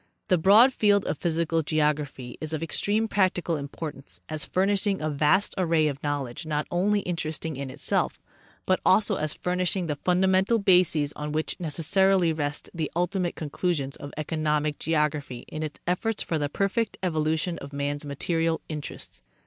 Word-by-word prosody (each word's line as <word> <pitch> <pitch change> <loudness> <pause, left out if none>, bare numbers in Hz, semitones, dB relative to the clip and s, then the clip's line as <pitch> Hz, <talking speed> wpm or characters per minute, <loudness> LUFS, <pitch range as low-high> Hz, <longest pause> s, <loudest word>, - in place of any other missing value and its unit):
The 185 - +5
broad 215 +9 +7
field 205 -3 +3
of - - -2
physical 165 -1 0
geography 150 -4 -1
is 155 0 -4
of 160 0 -2
extreme 210 +6 +1
practical 185 -5 +1
importance 140 - -6
as 155 -1 -3
furnishing 195 +1 +1
a 155 0 -1
vast 155 +8 +2
array 165 -3 +3
of 140 -1 -3
Knowledge 145 -1 -3
not 150 -1 -1
only 205 +4 +2
in 180 -2 -2
teresting 155 -1 -3
in 135 0 -5
itself, 130 - -1 0.5
but 185 - +2
also 205 +2 +3
as 155 0 -2
furnishing 180 +1 -1
the 150 -3 -2
fundamental 190 +6 +3
bases 180 -7 +3
on 150 0 -5
which 155 +4 -2
necessarily 175 +2 +2
rest 150 -1 -2
the 160 -3 -2
ultimate 180 0 0
conclusions 150 -2 -2
of 145 - -8
economic 150 -1 -1
geography 150 -5 -1
in 155 - -6
its 155 -1 -5
efforts 205 +5 -1
for 160 - -1
the 145 -1 -1
perfect 200 +8 -1
evolution 160 0 0
of 140 - -9
man's 145 +1 -2
material 165 +3 0
interests. 150 -2 -6
160 Hz, 160 wpm, -26 LUFS, 150-185 Hz, 0.5 s, broad